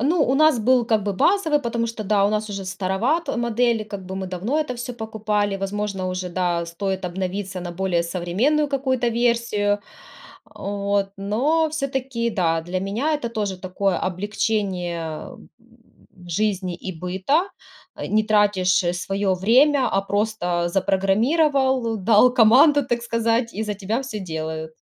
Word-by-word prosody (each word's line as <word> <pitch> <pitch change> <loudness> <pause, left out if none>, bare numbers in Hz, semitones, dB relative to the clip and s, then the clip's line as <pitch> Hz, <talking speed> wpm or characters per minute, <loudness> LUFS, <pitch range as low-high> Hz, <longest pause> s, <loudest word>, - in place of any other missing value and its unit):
Ну, 305 +6 +2
у 260 - +1
нас 310 -2 +4
был 245 +2 +3
как 220 -4 +1
бы 205 - -1
базовый, 320 - +2
потому 235 -2 -1
что, 225 -1 -5
да, 205 -1 +2
у - - +1
нас 215 0 -2
уже 195 -1 -5
староват 190 - -1
модель, 235 -1 +1
как 200 -3 -8
бы, 190 +1 -6
мы 190 0 -4
давно 190 - -2
это 300 -4 -1
всё 245 +1 -5
покупали, 215 -3 -2
возможно, 195 -1 -3
уже, 185 0 -3
да, 175 -2 -1
стоит 190 +2 -3
обновиться 185 +1 -4
на 175 0 -5
более 175 -1 0
современную 185 - 0
какую-то 260 -3 0
версию. 230 -3 +1 0.7
А, - - -16
вот, 200 0 -1
но 270 +12 +1
всё-таки, 265 -5 -2
да, 170 -6 0
для 175 +3 -3
меня 230 +11 -1
это 235 - -3
тоже 205 -4 -3
такое 185 0 -1
облегчение, 190 -2 -2
э, 160 -1 -5
м, 225 - -17 0.8
жизни 190 -1 -1
и - - -2
быта, 190 - +1 0.5
э, - - -5
не 215 0 +4
тратишь 205 -4 +3
своё 195 +2 -1
время, 255 +7 +4
а 195 - +2
просто 200 -4 -1
запрограммировал, 235 - +2
дал 220 +5 +4
команду, 265 +5 +6
так 240 -2 -1
сказать, 230 0 0
и 220 - -1
за 210 -1 -2
тебя 205 +5 -2
всё 250 -6 -5
делают. 160 -1 -5
210 Hz, 155 wpm, -22 LUFS, 190-240 Hz, 0.8 s, команду